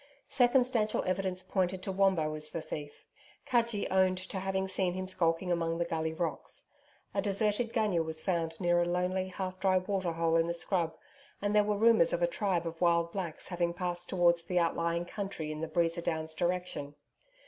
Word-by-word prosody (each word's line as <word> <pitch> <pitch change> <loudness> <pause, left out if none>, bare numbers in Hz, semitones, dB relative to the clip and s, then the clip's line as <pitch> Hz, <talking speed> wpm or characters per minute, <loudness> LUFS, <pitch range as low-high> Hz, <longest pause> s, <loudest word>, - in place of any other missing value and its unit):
Circumstantial 245 -4 +3
evidence 185 0 -1
pointed 185 0 -1
to 195 - -2
Wombo 185 -5 +2
as 155 0 -4
the 165 - -4
thief. 145 -2 -7 0.4
Cudgee 235 -4 +1
owned 185 -1 +3
to 190 +1 -4
having 190 0 -1
seen 185 -1 0
him 185 0 -3
skulking 180 -1 0
among 165 -1 0
the 170 - 0
Gully 160 -1 -1
rocks. 160 0 -4 0.4
A 195 - +1
deserted 210 +3 0
gunya 215 -7 +1
was 160 0 -2
found 165 -2 -1
near 175 -1 +3
a - - +2
lonely, 180 +2 0
half 185 0 -5
dry 190 -1 +3
waterhole 170 -4 0
in 165 0 +2
the 170 - -1
scrub, 170 -2 0 0.4
and 205 +1 0
there 210 - +6
were 205 0 0
rumours 220 -5 +5
of 175 - 0
a - - +7
tribe 175 0 -1
of 165 0 -6
wild 170 -1 +3
blacks 175 -5 -5
having 175 -1 -1
passed 175 -1 -2
towards 175 -2 +3
the 180 +2 -3
outlying 170 0 +1
country 180 -5 -4
in 155 0 -5
the 165 - -2
Breeza 170 0 0
Downs 160 -1 -2
direction. 175 -4 -2
180 Hz, 185 wpm, -31 LUFS, 165-190 Hz, 0.4 s, a